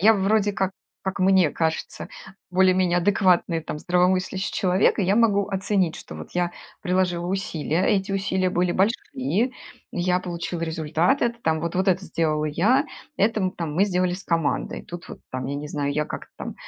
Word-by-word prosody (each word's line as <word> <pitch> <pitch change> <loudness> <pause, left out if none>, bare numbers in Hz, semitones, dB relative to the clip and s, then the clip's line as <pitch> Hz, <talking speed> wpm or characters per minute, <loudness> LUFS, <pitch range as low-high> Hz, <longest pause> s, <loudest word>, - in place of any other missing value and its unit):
я 215 +4 +7
вроде 205 +1 +2
как, 190 -1 -1 0.3
как 190 0 -3
мне 185 -4 +4
кажется, 160 0 -2 0.4
более-менее 185 -1 +3
адекватный, 180 -3 +2
там, 150 -1 -6
здравомыслящий 185 +2 +1
человек, 185 0 +2
и - - +2
я 195 +3 +2
могу 205 -4 +3
оценить, 190 -3 0
что - - -10
вот 80 0 -8
я 175 0 0 0.3
приложила 180 -2 0
усилия, 180 -3 -1
а - - +1
эти 195 -1 +1
усилия 190 -1 0
были 180 0 +1
большие, 200 +6 +3 0.2
и 255 -2 0 0.4
я 180 +1 +1
получила 175 -1 -4
результат, 160 - +1
это, 235 0 0
там, 160 -1 +1
вот 170 +1 -3
вот 190 +2 +2
это 190 +1 +2
сделала 155 -3 0
я, 205 - +2 0.3
это, 205 -2 +2
там, 160 -3 -3
мы 190 +5 +4
сделали 180 -2 0
с 190 +1 -9
командой. 165 -4 -1
Тут 175 0 -9
вот, - - -9
там, 130 0 -4
я 140 - -3
не 145 +1 -5
знаю, 145 -1 -2
я 150 +1 0
как-то - - -7
там - - -6
180 Hz, 185 wpm, -24 LUFS, 165-195 Hz, 0.4 s, я